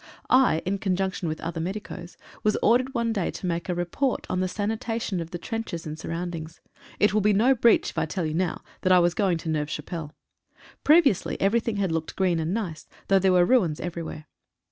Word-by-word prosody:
I, 250 Hz, -11 st, +4 dB
in 195 Hz, +2 st, -1 dB
conjunction 190 Hz, -2 st, -1 dB
with 155 Hz, 0 st, -3 dB
other 165 Hz, 0 st, -4 dB
medicos, 180 Hz, -1 st, -6 dB, 0.2 s
was 215 Hz, -1 st, +2 dB
ordered 255 Hz, +4 st, +3 dB
one 230 Hz, -1 st, +1 dB
day 195 Hz, -5 st, -1 dB
to -, -, -6 dB
make 170 Hz, 0 st, -2 dB
a 180 Hz, -, 0 dB
report 175 Hz, +10 st, -1 dB
on 185 Hz, -, 0 dB
the 185 Hz, -, +1 dB
sanitation 215 Hz, +1 st, -2 dB
of 165 Hz, -1 st, -5 dB
the 175 Hz, -, -5 dB
trenches 225 Hz, -4 st, -5 dB
and 155 Hz, 0 st, -6 dB
surroundings. 165 Hz, -1 st, -5 dB, 0.4 s
It 205 Hz, -1 st, +4 dB
will 215 Hz, -, +3 dB
be 210 Hz, +1 st, +3 dB
no 235 Hz, +7 st, +4 dB
breach 235 Hz, -2 st, +3 dB
if -, -, -3 dB
I 160 Hz, -, 0 dB
tell 175 Hz, +2 st, -2 dB
you 155 Hz, -, -2 dB
now, 175 Hz, +1 st, -1 dB, 0.2 s
that 185 Hz, -, +2 dB
I 185 Hz, -, +7 dB
was 175 Hz, -1 st, +3 dB
going 185 Hz, -3 st, +1 dB
to 165 Hz, -, -6 dB
Neuve 150 Hz, -1 st, -1 dB
Chapelle. 165 Hz, -3 st, -6 dB, 0.7 s
Previously 300 Hz, -, +4 dB
everything 225 Hz, +2 st, +1 dB
had 195 Hz, -4 st, 0 dB
looked 160 Hz, -1 st, -3 dB
green 180 Hz, -3 st, +1 dB
and 160 Hz, +1 st, -1 dB
nice, 185 Hz, -7 st, -4 dB, 0.2 s
though 195 Hz, 0 st, +5 dB
there 190 Hz, 0 st, +3 dB
were 180 Hz, -1 st, +5 dB
ruins 180 Hz, -10 st, +2 dB
everywhere. 170 Hz, -3 st, -5 dB
185 Hz, 210 wpm, -26 LUFS, 165-215 Hz, 0.7 s, I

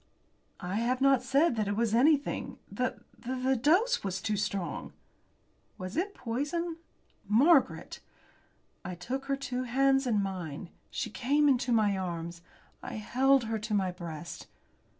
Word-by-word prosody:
"I 185 Hz, +2 st, -3 dB
have 245 Hz, +3 st, +1 dB
not 270 Hz, -2 st, +4 dB
said 270 Hz, +3 st, +3 dB
that 215 Hz, -2 st, 0 dB
it 205 Hz, -, 0 dB
was 225 Hz, 0 st, +1 dB
anything. 285 Hz, +4 st, +2 dB
The -, -, -2 dB, 0.2 s
the 260 Hz, +1 st, 0 dB
dose 355 Hz, -, +3 dB
was 190 Hz, -1 st, -2 dB
too 210 Hz, +3 st, -1 dB
strong." 200 Hz, -3 st, -3 dB, 0.8 s
"Was 185 Hz, +2 st, -6 dB
it 395 Hz, +5 st, -1 dB
poison?" 295 Hz, +8 st, -2 dB, 0.5 s
"Margaret!" 270 Hz, -, +3 dB, 0.8 s
I 180 Hz, -, -5 dB
took 255 Hz, +10 st, -4 dB
her 275 Hz, 0 st, 0 dB
two 255 Hz, -2 st, -3 dB
hands 270 Hz, +2 st, +2 dB
in 220 Hz, -4 st, +2 dB
mine. 175 Hz, -3 st, -5 dB, 0.2 s
She 225 Hz, -, -4 dB
came 285 Hz, +6 st, +2 dB
into 255 Hz, -2 st, +2 dB
my 215 Hz, -3 st, +3 dB
arms. 170 Hz, -2 st, -4 dB, 0.4 s
I -, -, -7 dB
held 260 Hz, +5 st, +3 dB
her 225 Hz, -1 st, -2 dB
to 215 Hz, 0 st, -2 dB
my 190 Hz, -2 st, +1 dB
breast. 170 Hz, -2 st, -8 dB
240 Hz, 145 wpm, -30 LUFS, 200-275 Hz, 0.8 s, not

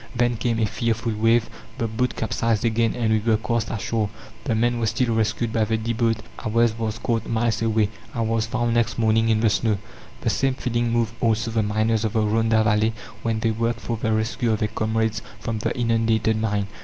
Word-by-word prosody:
Then 120 Hz, 0 st, +2 dB
came 115 Hz, +1 st, -1 dB
a 110 Hz, -, +2 dB
fearful 115 Hz, +2 st, -1 dB
wave, 115 Hz, +2 st, +3 dB, 0.3 s
the 115 Hz, -3 st, -1 dB
boat 110 Hz, +3 st, -1 dB
capsized 115 Hz, 0 st, 0 dB
again, 115 Hz, 0 st, +1 dB
and 115 Hz, -3 st, 0 dB
we 110 Hz, -, +3 dB
were 110 Hz, 0 st, +2 dB
cast 115 Hz, 0 st, -1 dB
ashore. 110 Hz, 0 st, -1 dB, 0.4 s
The 115 Hz, -, +1 dB
men 120 Hz, +2 st, +1 dB
were 115 Hz, -, 0 dB
still 120 Hz, +2 st, +1 dB
rescued 110 Hz, +1 st, 0 dB
by 110 Hz, -, +2 dB
the 110 Hz, +1 st, 0 dB
D. 115 Hz, +2 st, -2 dB
boat, 115 Hz, -1 st, +1 dB, 0.3 s
ours 115 Hz, +1 st, +2 dB
was 110 Hz, -1 st, -3 dB
caught 115 Hz, 0 st, -1 dB
miles 115 Hz, -1 st, 0 dB
away. 110 Hz, -2 st, +2 dB, 0.3 s
I 115 Hz, -, -1 dB
was 115 Hz, 0 st, 0 dB
found 120 Hz, 0 st, 0 dB
next 115 Hz, -1 st, +1 dB
morning 110 Hz, 0 st, +3 dB
in 110 Hz, -1 st, +3 dB
the 115 Hz, -, +4 dB
snow." 110 Hz, -1 st, +1 dB, 0.4 s
The -, -, +1 dB
same 135 Hz, -1 st, +1 dB
feeling 120 Hz, -2 st, -1 dB
moved 115 Hz, -1 st, +1 dB
also 110 Hz, 0 st, +1 dB
the 110 Hz, 0 st, +1 dB
miners 110 Hz, +1 st, +1 dB
of 110 Hz, -, -1 dB
the 110 Hz, -, +2 dB
Rhonda 110 Hz, +1 st, +2 dB
Valley, 110 Hz, +1 st, +2 dB, 0.3 s
when 115 Hz, -1 st, -1 dB
they 115 Hz, -, +2 dB
worked 115 Hz, +1 st, -1 dB
for 115 Hz, -, -2 dB
the 110 Hz, 0 st, -1 dB
rescue 110 Hz, +2 st, 0 dB
of -, -, +1 dB
their 105 Hz, 0 st, -1 dB
comrades 110 Hz, 0 st, -1 dB, 0.2 s
from 115 Hz, -1 st, -3 dB
the -, -, -1 dB
inundated 115 Hz, -2 st, +2 dB
mine. 105 Hz, -2 st, 0 dB
115 Hz, 215 wpm, -23 LUFS, 110-115 Hz, 0.4 s, the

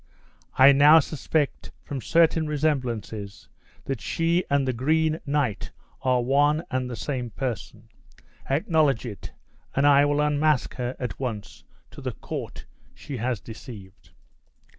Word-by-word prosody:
I 135 Hz, +2 st, +8 dB
now 145 Hz, +3 st, +7 dB
suspect, 150 Hz, 0 st, -2 dB
from 140 Hz, -3 st, -5 dB
certain 165 Hz, 0 st, +3 dB
remembrances, 125 Hz, -9 st, -3 dB, 0.4 s
that 135 Hz, -6 st, -3 dB
she 165 Hz, -, 0 dB
and 140 Hz, -1 st, +1 dB
the 130 Hz, -, 0 dB
Green 155 Hz, +5 st, +1 dB
Knight 140 Hz, -7 st, -1 dB, 0.3 s
are 125 Hz, -1 st, +2 dB
one 145 Hz, +5 st, +2 dB
aid 130 Hz, -1 st, -1 dB
the 120 Hz, -, -5 dB
same 125 Hz, -2 st, -4 dB
person. 115 Hz, -1 st, -5 dB, 0.6 s
Acknowledge 145 Hz, -3 st, +2 dB
it, 105 Hz, -5 st, -8 dB, 0.4 s
and 140 Hz, -, +2 dB
I 145 Hz, 0 st, +6 dB
will 145 Hz, 0 st, +1 dB
unmask 150 Hz, -1 st, +1 dB
her 125 Hz, 0 st, -3 dB
at 125 Hz, -, -5 dB
once 115 Hz, -6 st, -6 dB, 0.3 s
to -, -, -11 dB
the -, -, -4 dB
court -, -, -7 dB, 0.3 s
she 135 Hz, -, -7 dB
has 120 Hz, -1 st, -2 dB
deceived." 105 Hz, -4 st, -12 dB
135 Hz, 135 wpm, -25 LUFS, 120-150 Hz, 0.6 s, I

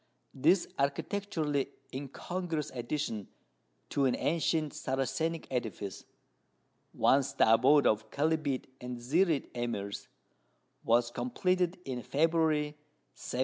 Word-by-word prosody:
This 175 Hz, +7 st, +4 dB
architecturally 150 Hz, 0 st, -1 dB, 0.2 s
incongruous 155 Hz, +4 st, -4 dB
addition 120 Hz, -4 st, -3 dB, 0.6 s
to 140 Hz, -, +1 dB
an 130 Hz, -, +3 dB
ancient 160 Hz, -1 st, 0 dB
Saracenic 135 Hz, +5 st, -1 dB
edifice 110 Hz, -6 st, -4 dB, 0.9 s
once 135 Hz, 0 st, +3 dB
the 110 Hz, -, +5 dB
abode 140 Hz, +5 st, +5 dB
of 110 Hz, 0 st, +2 dB
Kelbite 150 Hz, -2 st, 0 dB, 0.2 s
and 125 Hz, 0 st, -5 dB
Zirite 150 Hz, +6 st, +1 dB
Emirs 115 Hz, -5 st, -3 dB, 0.8 s
was 120 Hz, +1 st, +3 dB
completed 180 Hz, +10 st, 0 dB
in 125 Hz, -2 st, -3 dB
February, 155 Hz, +2 st, +1 dB, 0.4 s
1791. 125 Hz, -, -5 dB
140 Hz, 100 wpm, -31 LUFS, 120-160 Hz, 0.9 s, the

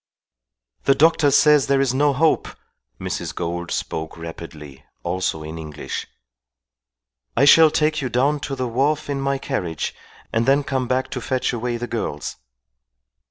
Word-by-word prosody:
"The 135 Hz, -, +5 dB
doctor 155 Hz, 0 st, +4 dB
says 150 Hz, 0 st, +5 dB
there 140 Hz, -1 st, +3 dB
is 135 Hz, -2 st, +2 dB
no 145 Hz, +2 st, +3 dB
hope," 155 Hz, +4 st, +2 dB, 0.5 s
Mrs. -, -, -4 dB
Gould 85 Hz, 0 st, -3 dB
spoke 80 Hz, +1 st, -4 dB
rapidly, 80 Hz, -4 st, -9 dB, 0.2 s
also 85 Hz, -3 st, -2 dB
in 80 Hz, +1 st, -7 dB
English. 75 Hz, -2 st, -6 dB, 1.3 s
"I -, -, +5 dB
shall 160 Hz, +2 st, +8 dB
take 155 Hz, 0 st, +1 dB
you 130 Hz, -, -2 dB
down 140 Hz, +5 st, +1 dB
to 135 Hz, -, -2 dB
the 130 Hz, -1 st, -2 dB
wharf 145 Hz, +5 st, 0 dB
in 140 Hz, -1 st, -2 dB
my 135 Hz, 0 st, 0 dB
carriage 90 Hz, -, -3 dB, 0.4 s
and 115 Hz, +2 st, +1 dB
then 140 Hz, +2 st, +4 dB
come 130 Hz, -2 st, -2 dB
back 130 Hz, +1 st, -1 dB
to 125 Hz, -, -4 dB
fetch 130 Hz, +1 st, -1 dB
away 120 Hz, 0 st, -2 dB
the 120 Hz, -, -4 dB
girls." 110 Hz, -11 st, -4 dB
130 Hz, 155 wpm, -22 LUFS, 85-140 Hz, 1.3 s, shall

